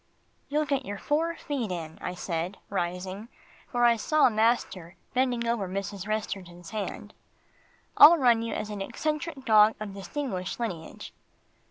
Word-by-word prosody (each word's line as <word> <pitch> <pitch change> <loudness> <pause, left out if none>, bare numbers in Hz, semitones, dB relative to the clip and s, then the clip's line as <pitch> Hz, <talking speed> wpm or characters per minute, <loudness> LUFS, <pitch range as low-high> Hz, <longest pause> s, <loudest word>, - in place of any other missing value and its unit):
"You'll 300 +2 +1
get 275 -2 0
your 205 -4 -5
four 325 +8 0
feet 260 - -3
in," 160 -3 -6
I 180 - -4
said, 175 +1 -3
rising, 185 +3 -3 0.4
for 240 -1 +1
I 235 -1 +5
saw 305 +5 +3
master 215 -6 0 0.2
bending 250 -2 +1
over 230 -5 0
Mrs. 195 +1 -4
Resterton's 190 -4 -4
hand. 215 -2 -5 0.8
"I'll 330 +3 +10
run 240 -5 +4
you 230 - -3
as 210 - -4
an 205 -1 -5
eccentric 305 - -3
dog 215 0 +6
of 210 -2 -6
distinguished 195 -1 -4
lineage." 175 -9 -5
215 Hz, 145 wpm, -28 LUFS, 190-255 Hz, 0.8 s, I'll